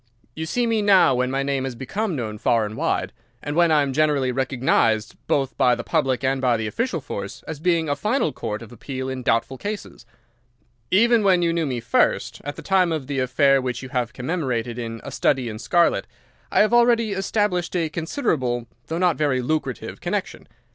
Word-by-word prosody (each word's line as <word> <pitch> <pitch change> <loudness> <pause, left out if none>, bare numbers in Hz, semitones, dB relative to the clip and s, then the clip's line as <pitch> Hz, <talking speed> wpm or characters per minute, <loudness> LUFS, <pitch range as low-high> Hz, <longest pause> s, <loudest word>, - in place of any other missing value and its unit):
You 160 0 -4
see 245 +8 0
me 225 -2 +1
now 195 -9 +5
when 125 0 0
my 135 +1 -1
name 135 -1 -1
has 130 -2 -4
become 190 - -3
known 110 -5 -4
far 115 0 +2
and 105 +1 -6
wide, 95 -3 -1 0.3
and 145 - -3
when 170 0 +4
I 150 -2 +4
am 135 -1 -2
generally 145 -3 +2
recognised 125 -4 +1
both 135 -2 0
by 125 -1 +4
the - - -6
public 135 -6 0
and 135 0 +1
by 125 -3 +2
the 110 - -3
official 180 - -2
force 100 -5 -6
as 160 -3 -5
being 165 -1 +1
a 145 - 0
final 225 - 0
court 110 -3 -5
of 115 - -13
appeal 130 +2 -5
in 130 -1 -4
doubtful 120 +2 0
cases. 205 - -6 0.8
Even 230 +3 +4
when 185 -3 +4
you 170 -1 +2
knew 165 -2 0
me 125 -3 -2
first, 115 - +1
at 145 +1 -5
the - - -9
time 185 -3 +2
of 155 -4 -2
the 140 0 -2
affair 135 +2 +3
which 125 -1 -3
you 130 - -7
have 125 -3 -1
commemorated 125 -5 -2
in 115 -1 -5
'A - - -7
Study 130 -3 +1
in 110 -1 -6
Scarlet,' 170 +8 +2 0.4
I - - +4
had 215 +2 +3
already 235 -2 +4
established 195 -2 -1
a 170 -2 +1
considerable, 150 - -1 0.2
though 165 - -3
not 180 -2 +2
a - - -18
very 135 -4 +1
lucrative, 140 -2 -3
connection. - - -3
140 Hz, 205 wpm, -23 LUFS, 125-175 Hz, 0.8 s, now